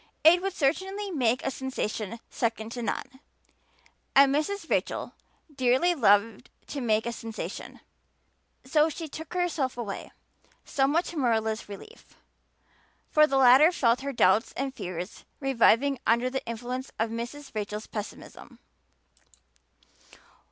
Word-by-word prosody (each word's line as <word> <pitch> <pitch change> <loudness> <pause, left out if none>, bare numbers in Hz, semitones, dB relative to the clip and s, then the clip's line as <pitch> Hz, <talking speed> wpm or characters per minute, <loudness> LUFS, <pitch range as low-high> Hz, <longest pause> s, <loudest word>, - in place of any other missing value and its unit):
It 345 +3 +7
would 390 0 -2
certainly 385 +7 -1
make 250 -6 +1
a 270 - 0
sensation 230 -4 -4
second 225 -1 -2
to 240 - -5
none, 250 +2 -4 1.0
and 275 0 +7
Mrs. 355 +8 -1
Rachel - - -1 0.4
dearly 260 +7 +3
loved 225 - +2 0.2
to 285 - -4
make 220 -2 +1
a 235 - -1
sensation. 225 -1 -7 0.8
So 300 +4 +3
she 320 +1 -6
took 320 +4 -9
herself 325 -8 -1
away, 210 -5 -5 0.5
somewhat 285 +5 +1
to 340 - -7
Marilla's 220 -5 0
relief, 430 - -12 1.0
for 305 0 +6
the 275 - +1
latter 265 +5 +7
felt 245 -8 +2
her 280 +1 -3
doubts 215 -3 +3
and 270 0 -3
fears 180 -4 -6 0.2
reviving 270 0 +3
under 235 +3 +2
the 265 - -3
influence 250 +3 -5
of 225 +1 -1
Mrs. 240 +5 -6
Rachel's 210 0 -4
pessimism. 210 -2 -8
260 Hz, 125 wpm, -27 LUFS, 225-295 Hz, 1.0 s, It